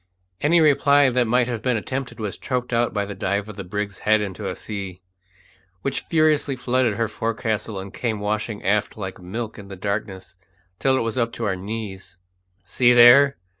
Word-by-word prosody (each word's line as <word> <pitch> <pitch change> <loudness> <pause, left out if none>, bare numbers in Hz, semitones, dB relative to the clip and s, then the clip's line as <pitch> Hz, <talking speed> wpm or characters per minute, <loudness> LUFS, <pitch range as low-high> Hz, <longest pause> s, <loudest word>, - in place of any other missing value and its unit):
Any 165 +4 +4
reply 145 -2 +4
that 125 -1 +2
might 120 +1 +2
have 120 -3 -3
been 125 0 +1
attempted 130 +3 -5
was 105 -3 -3
choked 125 -1 -3
out 120 +1 +2
by 100 -2 -1
the 100 - -6
dive 100 +1 -2
of 105 - -9
the 100 - -6
brig's 100 +2 -4
head 110 0 +3
into 100 -1 -4
a 90 - -4
sea, 100 -4 -6 0.8
which 140 - -1
furiously 155 -4 +2
flooded 125 -3 0
her 115 +1 0
forecastle 110 -2 -3
and 95 0 -8
came 110 -4 -2
washing 105 +1 -3
aft 105 +2 0
like 95 -2 -6
milk 110 +5 -6
in 100 - -10
the 100 - -8
darkness 95 -1 -4 0.4
till 130 -1 +2
it - - 0
was 115 +2 -2
up 115 -1 0
to 115 - -4
our 95 -2 0
knees. 95 -2 -7 0.5
"See 125 -1 +3
there!" 130 +4 +7
110 Hz, 190 wpm, -23 LUFS, 100-125 Hz, 0.8 s, there